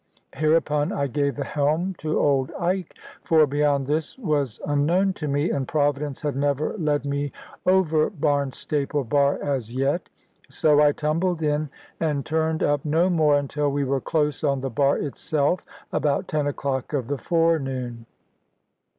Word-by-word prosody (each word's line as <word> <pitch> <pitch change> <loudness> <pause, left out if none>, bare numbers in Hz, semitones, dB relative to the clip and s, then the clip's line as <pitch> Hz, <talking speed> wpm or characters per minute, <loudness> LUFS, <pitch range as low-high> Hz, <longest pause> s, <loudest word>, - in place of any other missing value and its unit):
Hereupon 155 -1 +1
I 140 - -1
gave 140 +1 -1
the 145 - -3
helm 155 +7 0
to 155 0 -1
old 135 -2 +2
Ike, 180 0 -2 0.3
for 160 -2 +4
beyond 145 -1 +1
this 155 - -2
was 150 - -1
unknown 170 +7 +2
to 155 - -5
me, 145 +3 0
and 135 -2 -2
Providence 145 -2 -1
had 145 -2 -1
never 145 +1 0
led 150 -3 0
me 140 0 -2 0.4
over 165 -5 +3
Barnstaple 145 - -1
bar 140 +3 +2
as 130 -5 -2
yet. 140 +6 0 0.4
So 150 -1 +3
I 150 -1 +6
tumbled 160 +3 -1
in, 150 0 0 0.3
and 150 -4 -1
turned 160 0 0
up 145 -1 +1
no 165 +5 +2
more 155 -4 +4
until 145 +1 -1
we 140 0 0
were 135 0 0
close 150 -2 -1
on 140 -3 +1
the 135 -1 -3
bar 140 +4 +2
itself, 150 +3 -1 0.3
about 145 -2 0
ten 150 -2 0
o'clock 135 -1 -3
of 135 -5 0
the 140 +2 -3
forenoon. 135 -9 0
145 Hz, 155 wpm, -24 LUFS, 140-155 Hz, 0.4 s, I